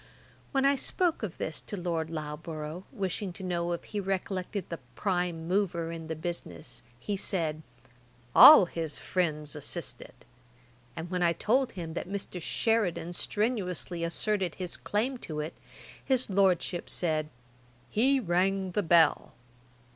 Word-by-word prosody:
When 270 -1 +2
I 280 - +5
spoke 345 +5 0
of 210 -7 -4
this 155 - -3
to 205 - -6
Lord 170 -3 -2
Loughborough, 155 +2 -6
wishing 190 0 -3
to 190 - -9
know 175 -1 -1
if 170 - -5
he 210 - -4
recollected 190 0 -3
the 170 - -5 0.2
prime 175 -4 -1
mover 175 -3 0
in 165 -1 -7
the 160 - -3
business, 125 - -6 0.2
he 205 - -2
said, 160 -5 -1 0.7
'All 300 -11 +11
his 165 -3 -3
friends 155 -5 -1
assisted:' - - -5 0.7
and 170 +2 -6
when 180 -1 -1
I 170 -1 +4
told 255 +8 +1
him 165 -3 -6
that 175 - -5
Mr. 195 -2 -4
Sheridan 185 -5 0
strenuously 185 -5 -1
asserted 185 +1 0
his 180 -2 -4
claim 245 +5 -1
to 155 -7 -5
it, 150 +2 -4 0.5
his 255 -5 +1
Lordship 185 -2 +2
said, 155 -3 0 0.6
'He 265 +5 +3
rang 190 -1 +1
the 205 - +1
bell.' 165 -4 +4
180 Hz, 140 wpm, -29 LUFS, 165-200 Hz, 0.7 s, All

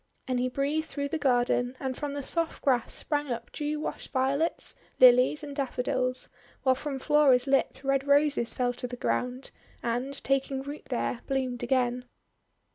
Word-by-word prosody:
And 255 -1 0
he 255 +1 0
breathed 290 +4 -1
through 285 -2 -3
the 320 - -2
garden, 245 -1 +1
and 260 -2 -3
from 290 +1 -4
the 285 - -4
soft 330 +3 0
grass 255 -5 +2
sprang 295 -1 -2
up 235 0 -5
dew 300 0 -3
washed - - -5
Violets, 275 +5 0 0.2
Lilies, 255 +4 +6
and 285 -1 -7
Daffodils; 255 -2 0 0.4
while 260 - +5
from 275 +1 -4
Flora's 270 -3 +4
lips 270 0 +1
Red 275 0 +1
Roses 285 -4 +3
fell 245 -1 +1
to 250 0 -5
the 245 - -6
ground, 250 +2 -2 0.3
and, 245 +4 -2
taking 270 0 0
root 285 +2 -8
there, 245 -1 -2
bloomed 260 -2 -1
again. 250 0 0
265 Hz, 165 wpm, -28 LUFS, 250-285 Hz, 0.4 s, Lilies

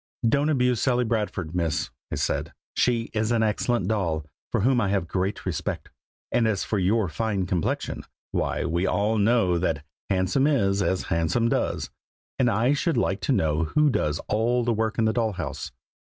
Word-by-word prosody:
"Don't 140 +6 +2
abuse 125 -5 +2
Sally 125 -2 +2
Bradford, 105 -7 -2
Miss!" 85 -7 -1 0.2
I - - -1
said. - - -1 0.2
"She 115 -2 +1
is 110 +1 0
an 115 -1 +2
excellent 115 +3 0
doll, 85 -8 -1 0.3
for - - +1
whom 125 +2 +3
I 100 - +1
have 100 -2 +1
a - - -11
great 95 +4 -2
respect; - - -3 0.4
and 120 -2 +3
as 105 -4 0
for 105 - -1
your 100 +3 +2
fine 100 +2 -1
complexion, 90 -2 -2 0.3
why, - - -1
we 85 +3 0
all 105 +2 +1
know 100 -5 +3
that 80 -4 -1 0.3
'handsome 95 +9 +2
is 100 -9 +2
as 95 -2 0
handsome 85 +9 +1
does;' - - -1 0.5
and 125 - +4
I 115 +5 +2
should 145 +4 0
like 95 +1 0
to 90 - 0
know 80 +1 +2
who 150 - +3
does 75 -9 0
all 120 +3 +1
the 120 0 +1
work 110 0 -1
in 115 - +2
the 110 - +2
doll 110 -2 0
house. 90 -6 -5
110 Hz, 185 wpm, -25 LUFS, 90-120 Hz, 0.5 s, and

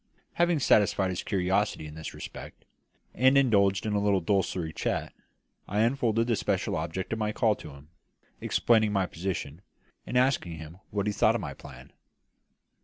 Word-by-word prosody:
Having 175 -1 +2
satisfied 100 -5 +3
his 90 - -3
curiosity 95 -2 0
in 75 - -9
this 80 +1 -7
respect, - - -10 0.5
and 130 +2 +4
indulged 100 -8 +3
in 105 - -1
a 105 - +2
little 100 -1 +2
desultory 90 -3 -1
chat, - - -2 0.5
I 105 +2 0
unfolded 115 -2 +1
the 115 -1 +1
special 100 0 -1
object 85 +5 -3
of 110 - -3
my 105 -1 0
call 110 0 +2
to - - -10
him, 70 +1 -14 0.5
explaining 110 -3 +2
my 95 -2 +2
position, 85 -3 -5 0.5
and 125 - -1
asking 125 -9 +2
him 80 +3 -10
what 100 -1 -2
he 105 - 0
thought - - +3
of - - -2
my - - -5
plan. - - -13
100 Hz, 170 wpm, -28 LUFS, 90-110 Hz, 0.5 s, and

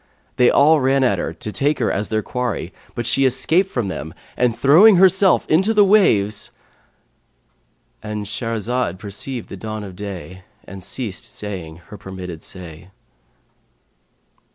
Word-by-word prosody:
They 125 - +5
all 155 +2 +5
ran 135 +1 +2
at 100 -8 +2
her - - -3
to 85 +6 -7
take 145 +6 0
her - - 0
as 105 +2 -2
their 110 -1 -1
quarry, 125 -4 -3 0.2
but 120 - -3
she 125 +4 +2
escaped 140 +9 +2
from 120 - -2
them 80 -4 -6 0.2
and, 120 -2 +1
throwing 180 +10 +7
herself 190 +1 +4
into 190 +8 +2
the 205 -1 +6
waves,"—And 105 - -3
Shahrazad 115 -1 -2
perceived 105 +5 -6
the 95 - -8
dawn 110 +1 -6
of 95 -3 -9
day 95 -1 -8 0.2
and 95 0 -11
ceased 110 -5 -5
saying 90 -6 -8
her 105 - -10
permitted 90 -4 -8
say. 90 -1 -10
110 Hz, 140 wpm, -20 LUFS, 95-135 Hz, 0.2 s, throwing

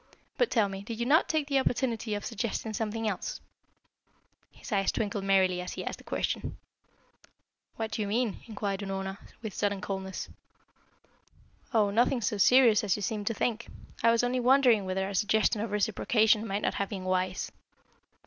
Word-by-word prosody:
But - - +2
tell 220 -4 +3
me, 195 0 -6
did 225 +3 -7
you 235 - 0
not 300 +6 +4
take 310 -2 +1
the 280 -1 +2
opportunity 235 -4 -1
of 205 - -5
suggesting 220 +1 -3
something 220 +1 -2
else?" 200 -4 -3 1.1
His - - -12
eyes 195 -2 +2
twinkled 205 -2 -2
merrily, 190 -2 +3
as 180 - -6
he - - -5
asked - - -4
the - - -14
question. - - -3 1.2
"What 220 -1 -3
do - - -2
you 205 - -1
mean?" 225 0 0
inquired 205 -3 -3
Unorna, 195 0 -4 0.2
with 215 -3 -5
sudden 205 +1 -1
coldness. 190 0 -4 1.4
"Oh, 215 -4 +3
nothing 240 +3 +2
so 210 -1 -1
serious 235 0 +6
as 200 -3 +2
you 210 - -5
seem 210 +1 -2
to 230 - 0
think. 235 +1 -1 0.3
I 230 - +5
was 230 +1 +3
only 250 +1 +1
wondering 250 -4 +4
whether 190 +1 -1
a 200 - -5
suggestion 210 +2 +2
of 225 - -3
reciprocation 215 +2 +2
might 200 0 -2
not - - +1
have 200 - -2
been 195 -3 -5
wise." 185 0 -1
210 Hz, 175 wpm, -29 LUFS, 195-230 Hz, 1.4 s, serious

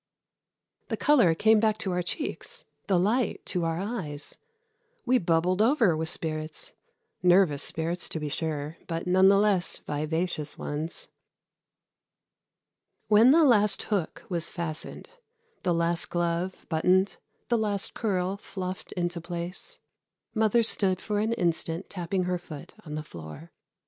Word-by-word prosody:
The - - -2
color 240 - +4
came 220 +5 +4
back 215 -1 +2
to 200 -4 -2
our 180 0 0
cheeks, 405 - -3 0.2
the 190 - +3
light 220 +7 0
to 180 -3 -1
our 165 0 -1
eyes. 180 -8 -4 0.7
We 255 0 +4
bubbled 175 +3 +1
over 225 - +4
with 160 +1 0
spirits 155 -1 -3 0.5
nervous 180 -5 +4
spirits, 170 +2 -1
to 160 - -2
be 150 - -3
sure, 150 +1 -3
but 165 -1 -3
none 185 +1 +5
the 195 - +5
less 200 -3 +2
vivacious 155 +1 -2
ones. 155 +3 -4 2.0
When 220 +3 +7
the 320 +4 +6
last 210 -7 +4
hook 200 -7 -2
was 170 -2 -1
fastened, 165 -3 -5 0.5
the 180 - 0
last 170 0 +2
glove 175 +1 -2
buttoned, 180 +4 +2 0.3
the 240 - +3
last 205 -2 0
curl 190 -3 -1
fluffed 185 -2 -6
into 175 -1 -2
place, 170 +1 -5 0.5
mother 220 +1 +3
stood 190 -4 +2
for 210 -1 -2
an 220 +2 +1
instant 170 -2 -1
tapping 185 0 -2
her 180 0 -1
foot 155 -5 -10
on 150 - -5
the 155 - -4
floor. 85 - -10
180 Hz, 140 wpm, -27 LUFS, 165-205 Hz, 2.0 s, When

